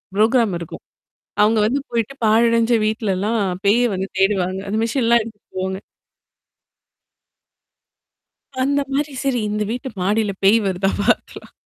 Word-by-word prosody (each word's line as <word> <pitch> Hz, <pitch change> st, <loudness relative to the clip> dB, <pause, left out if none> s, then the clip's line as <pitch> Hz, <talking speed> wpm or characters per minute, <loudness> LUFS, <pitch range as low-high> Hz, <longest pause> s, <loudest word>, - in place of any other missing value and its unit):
Program 220 Hz, -2 st, +3 dB
இருக்கும். 170 Hz, -2 st, -9 dB, 0.6 s
அவங்க 215 Hz, +1 st, +4 dB
வந்து 275 Hz, +5 st, 0 dB
போயிட்டு 235 Hz, +3 st, -2 dB
பாழடைஞ்ச 230 Hz, +2 st, +3 dB
வீட்லலாம் 215 Hz, 0 st, -1 dB, 0.2 s
பேய 220 Hz, +5 st, +4 dB
வந்து 190 Hz, +1 st, -3 dB
தேடுவாங்க. 190 Hz, -1 st, +1 dB
அந்த 215 Hz, +2 st, -1 dB
மிஷின்லாம் 235 Hz, -1 st, +2 dB
எடுத்துட்டு 215 Hz, -2 st, -12 dB
போவாங்க. 190 Hz, 0 st, -2 dB, 2.8 s
அந்த 280 Hz, +2 st, +1 dB
மாரி 290 Hz, 0 st, -1 dB
சரி 265 Hz, -3 st, 0 dB
இந்த 210 Hz, 0 st, -1 dB
வீட்டு 250 Hz, +2 st, -4 dB
மாடியில 205 Hz, +2 st, +1 dB
பேய் 210 Hz, +4 st, +5 dB
வருதா 195 Hz, 0 st, 0 dB
பார்த்துக்கலாம். 205 Hz, -, -1 dB
220 Hz, 120 wpm, -20 LUFS, 195-235 Hz, 2.8 s, பேய்